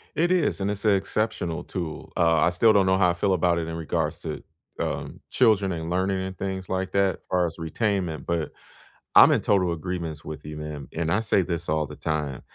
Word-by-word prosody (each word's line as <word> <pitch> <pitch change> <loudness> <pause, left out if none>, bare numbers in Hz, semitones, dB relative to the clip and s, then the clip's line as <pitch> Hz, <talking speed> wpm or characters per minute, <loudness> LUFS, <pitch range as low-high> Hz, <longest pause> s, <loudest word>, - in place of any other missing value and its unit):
It 175 +3 +2
is, 160 - +1
and 100 - 0
it's 105 +1 -3
a - - +5
exceptional 100 -3 -1
tool. 85 -4 -6
Uh, 85 -1 +3
I 85 - +4
still 110 +6 +4
don't 100 -2 +4
know 95 0 +3
how 90 -2 +5
I - - +2
feel 95 +2 +1
about 85 -1 +2
it 80 - -2
in 80 - -4
regards 80 -2 -2
to, - - -5 0.4
um, - - -4
children 105 -6 +3
and 80 -1 -4
learning 95 +2 0
and 95 0 -5
things 95 -1 -4
like 95 0 -2
that 100 -1 +2
as - - -23
far 90 -1 +2
as 80 - -7
retainment, 90 0 -2
but 85 -2 -1 0.6
I'm - - +9
in - - +3
total 90 -4 +2
agreements 85 -2 -4
with 75 - -7
you, 75 0 -7
man. 75 -2 -6
And 80 0 -1
I 105 - +3
say 110 -3 +2
this 85 -2 -3
all 80 -1 +1
the - - -9
time, 75 -5 -2
90 Hz, 225 wpm, -25 LUFS, 80-100 Hz, 0.6 s, I'm